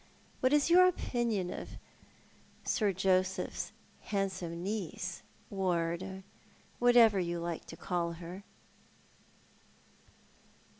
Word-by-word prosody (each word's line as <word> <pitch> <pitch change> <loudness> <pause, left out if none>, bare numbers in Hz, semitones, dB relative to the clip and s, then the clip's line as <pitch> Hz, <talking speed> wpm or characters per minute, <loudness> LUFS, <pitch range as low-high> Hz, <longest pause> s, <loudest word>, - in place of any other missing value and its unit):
What 255 - +3
is 295 +2 +3
your 365 +1 +8
opinion 235 - -1
of - - -8 0.9
Sir 210 -4 +1
Joseph's 185 0 0 0.3
handsome 185 -4 -3
niece 185 -3 -3
— - - -31
ward 185 0 -1 0.3
— - - -30
whatever 240 -4 +6
you 175 -1 -1
like 170 -1 -4
to 165 - -10
call 170 -2 -1
her? 175 +3 -8
190 Hz, 100 wpm, -32 LUFS, 175-220 Hz, 0.9 s, your